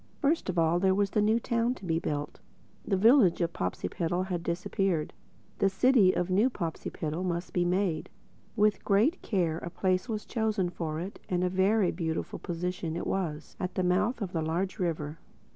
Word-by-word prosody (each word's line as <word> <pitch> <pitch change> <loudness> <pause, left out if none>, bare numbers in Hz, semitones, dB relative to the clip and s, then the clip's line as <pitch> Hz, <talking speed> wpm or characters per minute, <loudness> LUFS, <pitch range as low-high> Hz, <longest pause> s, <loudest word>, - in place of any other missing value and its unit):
First 295 - +1
of 180 - -2
all 165 +1 +3
there 190 0 +3
was 200 0 +1
the 210 - +2
new 220 +2 +3
town 235 +1 0
to 195 - -11
be 165 -2 +1
built. 150 -3 -4 0.4
The 195 - 0
village 220 -3 +5
of 170 -1 0
Popsipetel 165 - -2
had 180 -3 -3
disappeared: 170 -1 -1 0.5
the 195 - +4
City 205 -1 +4
of 180 0 -1
New 210 +7 +4
Popsipetel 165 -4 -4
must 175 -1 -3
be 175 - +2
made. 180 -2 0 0.5
With 210 -1 +2
great 225 - +2
care 170 -7 0
a 170 - -6
place 185 +4 0
was 215 -2 -3
chosen 215 -6 0
for 160 -3 -3
it—and 180 0 -3
a 180 - +2
very 190 +1 +3
beautiful 160 -2 -3
position 175 -2 -3
it 170 - -3
was, 160 -5 -3
at 180 0 -3
the 185 - +1
mouth 205 +6 +1
of 185 -2 -6
a 165 - +1
large 170 +4 -2
river. 160 -3 -2
185 Hz, 180 wpm, -29 LUFS, 170-205 Hz, 0.5 s, village